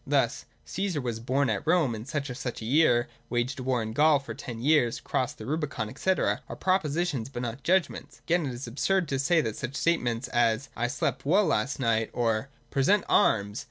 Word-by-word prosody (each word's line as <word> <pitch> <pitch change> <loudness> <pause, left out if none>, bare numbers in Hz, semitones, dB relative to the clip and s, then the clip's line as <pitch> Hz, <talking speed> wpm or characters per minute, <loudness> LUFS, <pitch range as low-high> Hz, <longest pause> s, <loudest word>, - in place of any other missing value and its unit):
Thus, - - +1
' - - -38
Caesar 190 -5 -2
was 120 -4 -3
born 130 +4 +1
at 105 +7 -3
Rome 165 -7 +3
in 110 0 -6
such 140 0 -3
and 125 - -5
such 125 -3 -5
a - - -5
year, 120 -2 +3 0.2
waged 125 +4 -1
war 130 -2 0
in 110 0 -5
Gaul 150 +3 +5
for 135 -5 -7
ten 120 -2 -7
years, 125 -3 +2
crossed 130 - -2
the 110 - -8
Rubicon, 140 -5 -3
&c.,' 190 - +1
are - - -2
propositions, 165 -8 0
but 125 -3 -5
not 120 +3 -4
judgments. 180 -1 0
Again 170 -3 +1
it 130 - -4
is 125 - -6
absurd 170 +9 0
to 135 - -1
say 160 +4 +3
that 110 -5 -4
such 130 +2 -5
statements 125 -8 0
as, 120 +2 +1
' - - -30
I 120 - 0
slept 125 - -2
well 190 +8 +3
last 140 -4 0
night,' 115 -3 +1
or 115 +1 0
' - - -36
Present 195 +10 +3
arms 100 0 +2
130 Hz, 215 wpm, -27 LUFS, 115-155 Hz, 0.2 s, Gaul